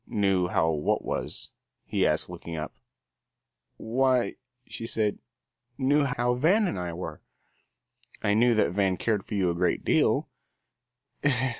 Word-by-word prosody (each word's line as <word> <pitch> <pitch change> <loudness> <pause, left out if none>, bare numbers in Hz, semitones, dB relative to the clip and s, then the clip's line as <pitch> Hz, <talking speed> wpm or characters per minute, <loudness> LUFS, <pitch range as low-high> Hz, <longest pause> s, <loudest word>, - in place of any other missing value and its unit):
"Knew 95 -4 +1
how 80 -2 +2
what 75 -2 0
was?" - - -4 0.3
he - - +1
asked, - - +1
looking 85 - -7
up. 75 0 -5 1.0
"Why," 125 +2 +1 0.3
she 115 - -6
said, 105 -3 0 0.6
"knew 145 +2 +3
how 125 -2 0
Van 175 - +3
and 100 - -3
I 90 -1 -3
were." 80 -3 -6 1.0
"I 100 - +3
knew 120 +2 +4
that 105 - +2
Van 95 -1 +1
cared 105 -4 0
for 105 - -6
you 95 -3 +2
a - - -1
great 90 +1 0
deal." - - +2
105 Hz, 140 wpm, -27 LUFS, 90-125 Hz, 1.0 s, knew